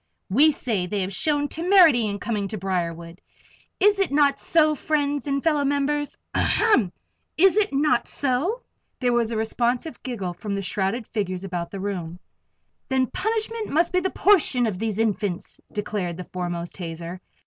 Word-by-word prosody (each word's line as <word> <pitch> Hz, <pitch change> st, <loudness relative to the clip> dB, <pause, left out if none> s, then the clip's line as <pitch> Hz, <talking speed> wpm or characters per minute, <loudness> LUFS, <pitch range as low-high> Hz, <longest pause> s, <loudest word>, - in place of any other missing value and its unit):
We 285 Hz, +10 st, +6 dB
say 225 Hz, -10 st, -1 dB
they 200 Hz, +2 st, -2 dB
have 190 Hz, +1 st, -3 dB
shown 290 Hz, +7 st, +1 dB
temerity 330 Hz, -, +5 dB
in 200 Hz, -1 st, -2 dB
coming 205 Hz, -2 st, -2 dB
to 215 Hz, -, -4 dB
Briarwood 170 Hz, -2 st, -3 dB, 0.6 s
is 405 Hz, 0 st, +4 dB
it 390 Hz, -, +1 dB
not 280 Hz, -1 st, +3 dB
so, 310 Hz, -2 st, +3 dB
friends 290 Hz, -1 st, -1 dB
and 275 Hz, -1 st, -1 dB
fellow 300 Hz, -3 st, +2 dB
members 285 Hz, +1 st, -1 dB, 0.2 s
ahem! 260 Hz, -, +3 dB, 0.5 s
is 380 Hz, +3 st, +5 dB
it 425 Hz, -1 st, +2 dB
not 275 Hz, -3 st, +2 dB
so?" 290 Hz, -, -1 dB, 0.4 s
There 245 Hz, -2 st, +1 dB
was 235 Hz, -1 st, +1 dB
a 225 Hz, -, -2 dB
responsive 240 Hz, +6 st, -1 dB
giggle 200 Hz, -9 st, -4 dB
from 200 Hz, +3 st, -4 dB
the 200 Hz, -, -3 dB
shrouded 195 Hz, +5 st, -1 dB
figures 190 Hz, -4 st, -3 dB
about 175 Hz, -3 st, -4 dB
the 195 Hz, -, -7 dB
room. 180 Hz, -4 st, -4 dB, 0.7 s
"Then 265 Hz, -1 st, +2 dB
punishment 445 Hz, +1 st, -2 dB
must 335 Hz, +4 st, +1 dB
be 365 Hz, -, +4 dB
the 380 Hz, +1 st, -1 dB
portion 335 Hz, -14 st, +3 dB
of 200 Hz, -5 st, -2 dB
these 220 Hz, -2 st, -2 dB
Infants," 205 Hz, -4 st, -2 dB
declared 200 Hz, -5 st, -3 dB
the 180 Hz, -, -5 dB
foremost 175 Hz, -1 st, -5 dB
hazer. 170 Hz, 0 st, -6 dB
240 Hz, 165 wpm, -24 LUFS, 190-300 Hz, 0.7 s, We